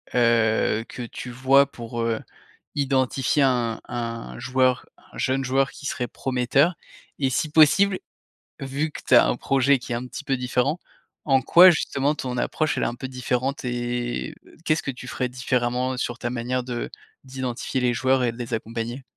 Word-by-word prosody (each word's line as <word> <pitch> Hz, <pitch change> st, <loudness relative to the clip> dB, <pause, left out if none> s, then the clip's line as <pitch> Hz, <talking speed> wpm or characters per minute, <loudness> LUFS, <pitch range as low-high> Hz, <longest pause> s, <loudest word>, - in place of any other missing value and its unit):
heu, 115 Hz, -2 st, +3 dB
que 125 Hz, -, -6 dB
tu 120 Hz, +1 st, -7 dB
vois 135 Hz, +3 st, +4 dB
pour, 115 Hz, 0 st, -6 dB
heu, 115 Hz, -1 st, 0 dB, 0.6 s
identifier 135 Hz, 0 st, +1 dB
un 120 Hz, -4 st, +1 dB
un 115 Hz, -, -5 dB
joueur, 130 Hz, -1 st, +1 dB, 0.3 s
un -, -, -11 dB
jeune 135 Hz, +1 st, 0 dB
joueur 135 Hz, +1 st, +1 dB
qui -, -, -12 dB
serait 125 Hz, -3 st, -2 dB
prometteur? 135 Hz, +8 st, +1 dB, 0.4 s
Et 135 Hz, -2 st, +1 dB
si 150 Hz, +4 st, -1 dB
possible 185 Hz, +6 st, +5 dB, 0.6 s
vu 140 Hz, +3 st, -2 dB
que -, -, -9 dB
tu 130 Hz, -, +5 dB
as -, -, +7 dB
un -, -, +1 dB
projet 135 Hz, +1 st, +2 dB
qui 120 Hz, -, -9 dB
est -, -, 0 dB
un 125 Hz, +2 st, -4 dB
petit 135 Hz, -, -8 dB
peu 135 Hz, -2 st, 0 dB
différent, 125 Hz, +5 st, 0 dB, 0.5 s
en 135 Hz, -2 st, +3 dB
quoi 180 Hz, +6 st, +8 dB
justement 145 Hz, -2 st, 0 dB
ton 125 Hz, -4 st, -4 dB
approche 155 Hz, +4 st, 0 dB
elle -, -, 0 dB
est -, -, +1 dB
un 120 Hz, -, -3 dB
peu 130 Hz, +2 st, -6 dB
différente? 130 Hz, +1 st, -2 dB
Et, 120 Hz, -, -3 dB, 0.3 s
qu'est-ce 155 Hz, 0 st, +1 dB
que 135 Hz, -, -2 dB
tu 125 Hz, 0 st, -10 dB
ferais 125 Hz, 0 st, -2 dB
différemment, 125 Hz, 0 st, -1 dB
sur 120 Hz, -1 st, -3 dB
ta 120 Hz, -, -2 dB
manière 125 Hz, +1 st, -2 dB
de 120 Hz, -1 st, -4 dB, 0.4 s
d'identifier 130 Hz, 0 st, -3 dB
les 125 Hz, -1 st, +2 dB
joueurs 130 Hz, +2 st, +2 dB
et 120 Hz, -, +1 dB
de 115 Hz, -, -13 dB
les 120 Hz, 0 st, -5 dB
accompagner? 115 Hz, +3 st, -4 dB
125 Hz, 180 wpm, -24 LUFS, 120-135 Hz, 0.6 s, quoi